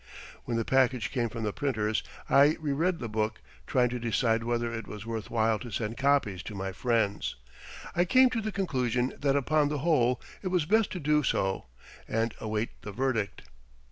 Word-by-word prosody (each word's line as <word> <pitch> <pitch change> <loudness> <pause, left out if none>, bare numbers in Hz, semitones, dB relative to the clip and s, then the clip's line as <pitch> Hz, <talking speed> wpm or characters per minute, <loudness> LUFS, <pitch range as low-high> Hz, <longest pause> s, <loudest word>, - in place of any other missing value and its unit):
When 115 - -1
the 115 - -1
package 130 -4 +2
came 120 -3 0
from 115 0 -5
the 105 -1 -1
printers 110 -7 0 0.3
I 140 +3 +5
re 150 -2 -2
read 170 +5 +1
the 120 - -5
book 110 0 -1 0.3
trying 125 -1 +3
to 125 0 -3
decide 115 0 +1
whether 120 0 -1
it 115 -3 -5
was 105 +1 -8
worth 110 -4 -4
while 110 -1 +2
to 120 - -7
send 115 0 -3
copies 135 -10 +2
to 105 - -8
my 95 0 -3
friends. 110 0 0 0.6
I 175 +1 +3
came 255 +7 +5
to 230 - -1
the 215 0 -3
conclusion 130 - 0
that 140 -1 +2
upon 145 +2 +2
the 150 - -1
whole 125 -7 +3 0.2
it 190 - -4
was 180 -4 +1
best 220 +5 +3
to 185 - -4
do 150 0 +3
so 95 - 0 0.4
and 115 +1 0
await 110 +1 -3
the 105 - -7
verdict. 115 -3 -1
120 Hz, 195 wpm, -29 LUFS, 110-145 Hz, 0.6 s, I